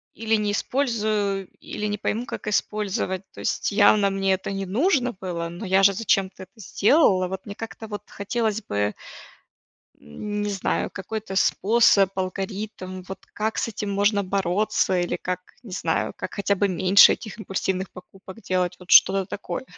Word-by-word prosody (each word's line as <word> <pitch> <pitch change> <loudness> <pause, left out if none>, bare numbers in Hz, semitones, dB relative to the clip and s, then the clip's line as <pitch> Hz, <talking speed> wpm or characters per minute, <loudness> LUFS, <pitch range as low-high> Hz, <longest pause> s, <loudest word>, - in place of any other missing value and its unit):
или 225 0 +1
не 210 -1 0
использую, 210 -6 -1
или 210 - -5
не 205 0 -2
пойму, 225 +3 -2
как 220 - -7
использовать. 200 -3 -1
То - - -11
есть - - -1
явно 205 0 +5
мне 195 0 +1
это 190 +1 -3
не 195 0 -3
нужно 250 - +1
было, 170 -3 -5
но 175 +5 -7
я 190 +1 +3
же 200 0 +6
зачем-то 190 -2 0
это 195 +4 -18
сделала, 200 - +3
вот, 190 +1 -6
мне 205 -1 -7
как-то, 225 0 -8
вот 205 -1 -6
хотелось 220 +1 -2
бы 105 0 -1 1.1
м, 205 - -5
не 205 - -1
знаю, 195 -2 -1
какой-то 200 0 -6
способ, 200 -1 +4
алгоритм, 190 0 -4
вот 190 0 -8
как 220 +1 -2
с - - 0
этим 210 -2 -4
можно 200 0 +2
бороться, 190 0 +1
или 175 0 -1
как, 180 0 -3 0.2
не 220 - -12
знаю, 185 - -1
как - - -6
хотя 200 -1 0
бы 205 - +2
меньше 185 +2 +6
этих 215 0 -7
импульсивных 190 -2 -2
покупок 190 +3 -13
делать. 180 -1 0
Вот 180 - -13
что-то 195 0 +7
такое. 205 +6 -5
200 Hz, 165 wpm, -24 LUFS, 190-215 Hz, 1.1 s, что-то